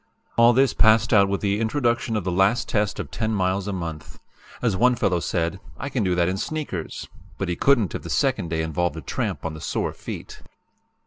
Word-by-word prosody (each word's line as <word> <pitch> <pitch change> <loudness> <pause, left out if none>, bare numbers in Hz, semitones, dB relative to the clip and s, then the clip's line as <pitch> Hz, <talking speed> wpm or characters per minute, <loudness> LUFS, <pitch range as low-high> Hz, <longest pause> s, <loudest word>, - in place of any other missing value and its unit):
"All 115 0 +6
this 130 +1 +3
passed 110 0 +4
out 100 -2 +5
with 100 - -1
the 100 0 0
introduction 120 0 0
of 105 - -1
the 90 - -1
last 95 +7 +2
test 105 -1 0
of - - -5
10 110 -1 -1
miles 95 0 0
a - - -1
month. 85 -5 -6 0.4
As 115 -6 +1
one 125 +5 +4
fellow 90 -7 +1
said: 85 +2 -1 0.2
'I 140 - -4
can 130 -5 -1
do 90 -2 +1
that 85 -1 +2
in 95 +1 -1
sneakers' 145 - -4 0.3
but 95 - -3
he 85 - 0
couldn't 120 -3 +3
if - - -4
the - - -8
second 85 - 0
day 80 0 -1
involved 80 +1 -1
a - - -5
tramp 70 - -3
on 80 - -2
the 80 - -9
sore - - -2
feet. - - -8
100 Hz, 215 wpm, -24 LUFS, 90-115 Hz, 0.4 s, All